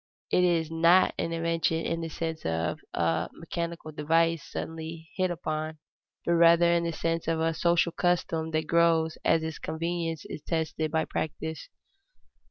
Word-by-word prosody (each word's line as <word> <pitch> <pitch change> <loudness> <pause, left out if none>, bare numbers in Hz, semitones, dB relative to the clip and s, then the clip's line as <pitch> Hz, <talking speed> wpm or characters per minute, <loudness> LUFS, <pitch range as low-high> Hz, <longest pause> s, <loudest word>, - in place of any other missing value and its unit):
It 180 - +4
is 165 -3 +2
not 170 +3 +5
an 165 - -1
invention 165 0 0
in 165 0 -1
the 165 - -4
sense 160 0 -4
of 80 +1 -1
a 85 -1 0
mechanical 170 -1 -5
device 165 +2 +2
suddenly 160 0 -6
hit 185 -1 +1
upon, 155 -2 -3 0.5
but 170 - +2
rather 170 0 +6
in 170 0 +1
the 170 - 0
sense 165 0 -2
of 165 -1 +1
a 165 0 +1
social 170 +1 +2
custom 165 -2 0
that 155 0 -1
grows 165 0 +2
as 165 -1 +3
its 160 -1 -4
convenience 165 -1 -3
is - - -7
tested 160 -1 -2
by 160 +1 0
practice. 160 - -4
165 Hz, 160 wpm, -28 LUFS, 160-170 Hz, 0.5 s, rather